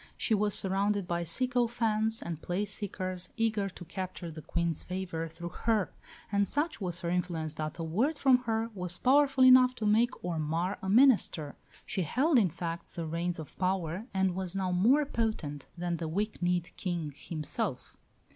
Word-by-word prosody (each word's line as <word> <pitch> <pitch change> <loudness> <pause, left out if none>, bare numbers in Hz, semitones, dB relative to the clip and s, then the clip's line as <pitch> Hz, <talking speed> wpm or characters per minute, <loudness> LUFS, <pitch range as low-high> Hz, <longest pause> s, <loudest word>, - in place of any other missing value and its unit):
She 225 - 0
was 205 -1 +2
surrounded 195 0 +1
by 170 0 -1
sycophants 225 +2 +1
and 165 -2 -5
place 200 +3 -2
seekers, 185 -3 -4
eager 220 -3 +1
to 180 -1 -11
capture 185 -1 -5
the 155 0 -8
Queen's 170 0 -1
favour 180 -3 -4
through 170 +2 -7 0.2
her. 220 -4 +2 0.4
And 200 -1 +2
such 295 -4 -1
was 175 -2 -3
her 170 - -2
influence 170 -3 -1
that 155 -1 -4
a 165 - -3
word 230 - 0
from 265 -3 +5
her 225 0 -1
was 180 -2 -4
powerful 270 0 +4
enough 255 0 +7
to 225 - -3
make 225 +3 +2
or 170 -3 -1
mar 165 +5 -1
a 190 - -3
minister. 210 - +4 0.3
She 190 - -2
held, 260 - +3
in 195 -5 +3
fact, 170 0 -6
the 170 - -3
reins 170 +2 -2
of 155 -4 -9
power 185 +2 -1
and 190 -1 +1
was 185 0 -4
now 190 -2 0
more 240 +12 +4
potent 215 - -2
than 175 0 -2
the 165 - -3
weak 205 +7 -2
kneed 175 -1 0
King 170 -6 -3
himself. 155 0 -4
185 Hz, 175 wpm, -30 LUFS, 170-225 Hz, 0.4 s, enough